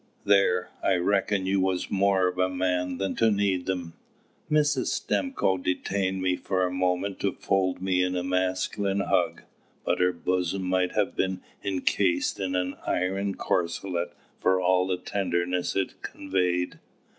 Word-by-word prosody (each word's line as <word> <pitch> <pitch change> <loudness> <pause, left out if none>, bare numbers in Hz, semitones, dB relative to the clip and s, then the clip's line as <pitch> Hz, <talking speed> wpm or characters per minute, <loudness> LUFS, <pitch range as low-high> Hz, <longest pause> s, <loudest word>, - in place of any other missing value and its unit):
There, 100 -3 +3
I 95 - +3
reckoned 95 +2 +1
you 95 0 +2
was 95 -1 -1
more 95 -1 +3
of 90 0 -3
a 95 0 +3
man 90 -1 -1
than 95 0 -2
to 115 - +4
need 100 -3 0
'em!" 90 -3 -3 0.6
Mrs. 150 -3 +2
Stimcoe 270 - 0
detained 95 +1 -1
me 90 -1 +2
for 95 0 0
a 90 - -2
moment 90 +2 0
to 100 - +1
fold 95 -2 0
me 95 -1 +2
in 90 0 0
a 90 - -1
masculine 95 +2 0
hug. - - 0 0.4
But - - +1
her 90 0 +4
bosom 90 +2 -1
might 90 0 +1
have 105 -2 0
been 95 -1 -1 0.2
encased 95 -1 +1
in 95 -1 -1
an 90 0 -1
iron 95 +2 0
corselet 85 0 -1 0.3
for 95 0 +3
all 90 0 +3
the 90 -1 0
tenderness 90 -1 -1
it 95 -1 -2
conveyed. 90 -2 -1
95 Hz, 155 wpm, -27 LUFS, 90-95 Hz, 0.6 s, to